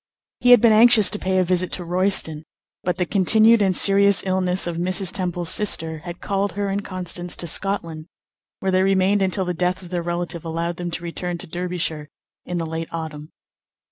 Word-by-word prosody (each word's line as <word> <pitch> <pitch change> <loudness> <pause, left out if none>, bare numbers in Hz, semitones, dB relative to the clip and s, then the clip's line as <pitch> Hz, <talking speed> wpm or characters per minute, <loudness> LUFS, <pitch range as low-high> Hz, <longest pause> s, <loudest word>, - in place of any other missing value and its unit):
He 245 - +1
had 245 -3 +7
been 230 - +5
anxious 220 -2 +6
to 210 - -3
pay 185 0 -1
a 185 - +3
visit 185 0 -1
to 180 - -3
Royston; 175 -3 0 0.4
but 180 +1 -2
the 180 - -1
continued 215 +5 +4
and 190 -3 +2
serious 200 0 +4
illness 185 -1 0
of 170 -1 -4
Mrs. 185 +2 -1
Temple's 175 -2 -3
sister 160 -6 +1
had 175 +2 -10
called 200 -2 -2
her 200 0 -3
and 200 +1 -3
Constance 180 -2 -3
to - - -4
Scotland, 165 -3 -2 0.5
where 190 - -1
they 185 0 +2
remained 195 +1 +1
until 190 0 +1
the 180 - -2
death 180 +2 -2
of 175 - -13
their 175 -1 -2
relative 175 0 -4
allowed 165 +1 -4
them 175 -1 -5
to 170 +1 -6
return 175 +1 -5
to - - -9
Derbyshire 170 -3 -4 0.4
in 180 - -4
the 165 - -3
late 160 0 -5
autumn. 155 -2 -7
180 Hz, 200 wpm, -21 LUFS, 170-195 Hz, 0.5 s, had